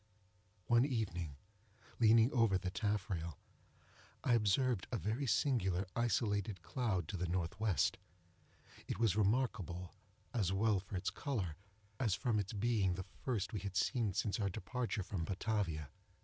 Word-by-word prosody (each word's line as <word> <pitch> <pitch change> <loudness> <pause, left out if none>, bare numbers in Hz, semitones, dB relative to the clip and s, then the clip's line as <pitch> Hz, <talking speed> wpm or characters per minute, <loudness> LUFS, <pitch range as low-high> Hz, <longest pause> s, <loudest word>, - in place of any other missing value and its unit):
One 120 +1 +5
evening, 95 - -2 0.6
leaning 115 +2 +6
over 115 -6 +4
the 95 -1 -3
taffrail, 95 -6 -2 0.9
I 125 - +3
observed 115 -1 +2
a 120 - 0
very 115 +7 -1
singular, 100 -9 +2
isolated 105 -5 0
cloud, 95 -7 -1
to 95 - -3
the 90 0 -1
N.W. 85 0 0 1.4
It - - -2
was 110 -4 +3
remarkable, 100 -5 0 0.4
as 100 -7 +1
well 105 +1 +3
for 95 +1 -8
its 90 - -1
color, 105 - -2 0.4
as 110 -7 +2
from 115 -1 +1
its 100 +3 -3
being 105 -4 +1
the 95 0 -5 0.2
first 115 -7 -1
we 105 - -1
had 95 0 -5
seen 110 +1 +1
since 100 +3 0
our 100 -2 +1
departure 110 +1 -2
from 90 -2 -3
Batavia. 90 - -1
105 Hz, 140 wpm, -37 LUFS, 95-115 Hz, 1.4 s, leaning